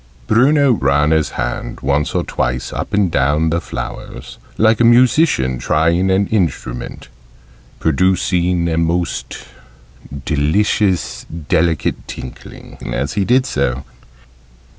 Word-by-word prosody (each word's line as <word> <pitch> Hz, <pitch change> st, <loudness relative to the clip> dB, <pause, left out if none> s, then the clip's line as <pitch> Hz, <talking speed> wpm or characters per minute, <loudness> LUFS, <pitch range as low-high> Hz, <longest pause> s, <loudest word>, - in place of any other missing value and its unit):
Bruno 135 Hz, +5 st, +4 dB
ran 75 Hz, -, +2 dB
his 80 Hz, -1 st, +2 dB
hand -, -, -4 dB
once 70 Hz, +2 st, 0 dB
or -, -, +1 dB
twice 65 Hz, +1 st, -3 dB
up -, -, -4 dB
and 100 Hz, -4 st, +1 dB
down 75 Hz, +4 st, +1 dB
the 85 Hz, +1 st, 0 dB
flowers, -, -, -7 dB, 0.2 s
like 110 Hz, 0 st, +3 dB
a -, -, +4 dB
musician 120 Hz, -, +3 dB
trying 85 Hz, +7 st, +1 dB
an 95 Hz, +2 st, +2 dB
instrument, 60 Hz, -, -3 dB, 0.7 s
producing 90 Hz, +1 st, +1 dB
a 80 Hz, -1 st, 0 dB
most 85 Hz, +1 st, -2 dB, 0.8 s
delicious 90 Hz, +5 st, 0 dB
delicate 80 Hz, -1 st, -1 dB
tinkling 65 Hz, -, -10 dB
as 70 Hz, +3 st, -2 dB
he 100 Hz, -, 0 dB
did 130 Hz, +5 st, +2 dB
so. 70 Hz, -, -1 dB
85 Hz, 115 wpm, -17 LUFS, 70-100 Hz, 0.8 s, Bruno